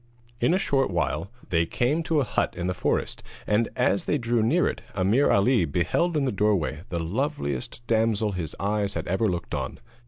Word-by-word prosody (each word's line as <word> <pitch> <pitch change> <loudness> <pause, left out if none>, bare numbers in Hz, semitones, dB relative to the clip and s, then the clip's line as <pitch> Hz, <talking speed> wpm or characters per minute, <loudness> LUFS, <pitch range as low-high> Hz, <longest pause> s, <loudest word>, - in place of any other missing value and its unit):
In - - +3
a - - +3
short 135 -7 +1
while 85 -1 -1 0.2
they 85 -1 +2
came 130 - +1
to 160 -2 +2
a - - +3
hut - - -1
in 90 - -2
the 90 - 0
forest, - - -1 0.2
and 105 +2 +2
as 100 - +1
they 150 - +1
drew 120 -2 +1
near 145 +11 +3
it - - -3
Ameer 100 +9 +3
Ali 115 0 +4
beheld 90 - 0
in 140 - +1
the 130 - +1
doorway 95 -7 +1
the 85 - -2
loveliest 85 - -3
damsel 110 -2 +1
his 85 -5 -4
eyes 100 0 0
had 80 - -3
ever 95 +5 +1
looked 85 -3 -3
on. - - -3
105 Hz, 195 wpm, -26 LUFS, 85-120 Hz, 0.2 s, Ali